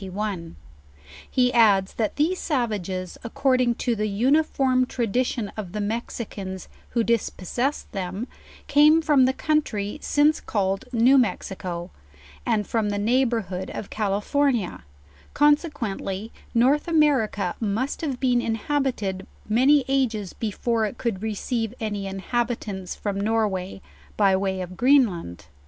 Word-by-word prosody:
He 250 -1 +2
adds, 205 -5 +4
that 220 -2 -1
these 335 +5 +1
savages, 200 - -2
according 250 0 +1
k> 245 0 -1
the 215 -1 -1
uniform 255 +3 +2
tradition 240 -2 -1
of 195 -5 -6
the - - -4
1GO - - -1
JOURNAL - - -1
OF - - -1
Mexicans 200 -5 -5 0.2
who 235 - +1
dispossessed 235 - -1
them, 195 +4 -4 0.4
came 300 +3 +5
from 290 -5 +5
the 260 - +3
country 285 -8 -1
since 295 +1 +2
called 195 +1 -1
New 250 +3 +5
Mexico, 185 -6 -3 0.6
and 210 -1 +1
from 220 -1 0
the 205 - -1
neighborhood 220 -5 0
of 200 - -6
Cali 205 -2 -1
fornia; 270 -6 0 0.5
consequently 240 - 0 0.2
North 270 +7 +3
America 260 - +2
must 225 +5 -2
have 275 -6 -3
been 250 -2 +2
inhabi 265 +4 0
ted 190 -1 -4 0.2
many 260 +6 +4
ages 235 -8 0
before 225 +1 -1
it 220 - -8
could 225 -6 -2
receive 225 +1 -2
any 205 -3 -3
inhabitants 200 -1 -3
fr 210 - -4
;m 200 -1 -2
Norway, 200 -3 -1 0.3
by 195 -2 +4
way 190 -1 -1
of 180 0 -7
Greenland. 220 - +2
225 Hz, 135 wpm, -24 LUFS, 200-260 Hz, 0.6 s, came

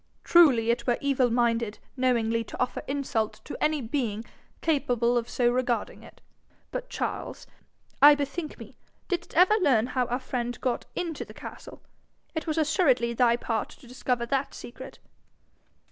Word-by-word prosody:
Truly 260 -10 +5
it 235 +1 -3
were 240 - +3
evil 270 -3 +2
minded 230 -2 +1 0.2
knowingly 230 -3 +1
to - - -9
offer 250 - -1
insult 260 -6 -2
to - - -6
any 305 -1 +2
being 230 -3 -2 0.4
capable 245 -6 +1
of 240 0 -1
so 240 -1 +2
regarding 245 -1 -1
it. - - -16 0.5
But, - - -5
Charles, - - -4 0.6
I 290 +1 +10
bethink 290 +3 -4
me: - - -12 0.3
didst 360 -4 -3
ever 365 +5 +6
learn 255 -9 +4
how 250 -2 +1
our 245 0 -1
friend 245 -2 -4
got 250 -2 -2
into 335 -3 -3
the - - -14
castle? - - -10 0.5
It 320 0 -4
was 315 0 -1
assuredly 290 -7 +2
thy 235 -1 +4
part 225 -2 -2
to 275 - -16
discover 250 -1 -2
that 270 +2 -1
secret.' 240 - -10
250 Hz, 155 wpm, -27 LUFS, 235-290 Hz, 0.6 s, I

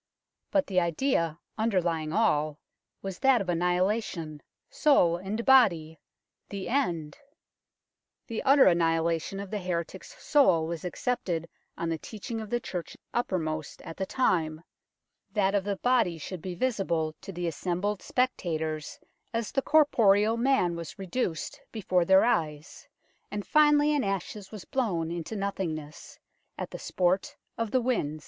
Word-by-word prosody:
But 290 -1 +2
the 185 -6 +2
idea 170 - 0 0.2
underlying 175 -8 0
all 155 -8 +1 0.5
was 195 -1 -5
that 265 -2 +4
of 190 - -4
annihilation, 175 -2 0 0.3
soul 175 - +3
and 200 +6 -4
body 175 - +4 0.5
the 200 +1 -5
end! 170 - -1 1.1
The 230 - -4
utter 275 +1 +6
annihilation 165 +1 +2
of 200 -1 -7
the 210 - -2
heretic's 180 - -5
soul 185 - +4
was 165 -1 -5
accepted 180 -4 -2 0.3
on 170 - -2
the 165 -1 -2
teaching 225 +3 -6
of 215 - -8
the 240 - 0
Church 180 -7 -6 0.2
uppermost 160 -9 -2
at 165 - -8
the 190 - -3
time; 165 -10 0 0.7
that 195 -2 +2
of 200 -2 +2
the 200 0 -1
body 245 -9 +2
should 170 +3 -7
be 180 0 -5
visible 170 -9 0
to - - -8
the 175 -1 -4
assembled 180 +5 -2
spectators 160 - -2 0.3
as 230 -1 -2
the 270 - +1
corporal 225 -8 +4
man 235 -8 +2
was 170 +3 -7
reduced 190 - -3
before 185 -5 +1
their 190 +2 +6
eyes, 155 -8 -2 0.4
and 205 -1 -4
finally 295 0 +4
in 290 - +1
ashes 195 0 -3
was 215 -4 -9
blown 180 -11 -1
into 170 +5 -5
nothingness 170 -7 -4 0.4
at - - -5
the - - -7
sport 185 +1 0 0.2
of 230 -1 -2
the 255 +4 +2
winds. 180 - -1
190 Hz, 140 wpm, -28 LUFS, 165-230 Hz, 1.1 s, utter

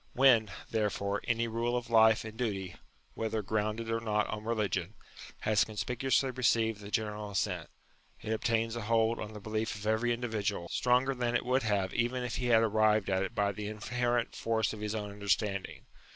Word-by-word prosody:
When, 125 -5 +5 0.2
therefore, 105 -2 -1
any 115 0 +1
rule 115 +2 -1
of 120 -1 -5
life 110 -1 +5
and 110 0 -7
duty, 100 -6 -3 0.4
whether 110 -1 -2
grounded 110 +2 -1
or 115 - +1
not 105 -2 0
on 105 0 -4
religion, 105 -4 -1 0.5
has 110 -1 +3
conspicuously 125 +5 0
received 115 -4 +1
the 100 - -8
general 105 -1 -2
assent, 100 - -2 0.5
it 110 - -3
obtains 115 +1 0
a 120 - -3
hold 115 +1 +2
on 105 +1 -6
the 105 - -7
belief 110 +2 -2
of 100 0 -8
every 110 +3 +1
individual, 110 -7 -2
stronger 125 +2 +2
than 120 -1 -1
it - - 0
would 130 +2 +2
have 100 -4 0
even 125 +1 0
if 120 -2 -3
he 125 - -1
had 115 -2 +5
arrived 110 -2 +3
at 95 0 +2
it 95 - -3
by 100 0 +2
the 105 +1 -5
in 105 0 -6
herent 120 +1 0
force 110 -2 0
of 110 - -7
his 105 0 -2
own 105 -2 -4
understanding. 100 -1 -1
110 Hz, 190 wpm, -31 LUFS, 105-115 Hz, 0.5 s, When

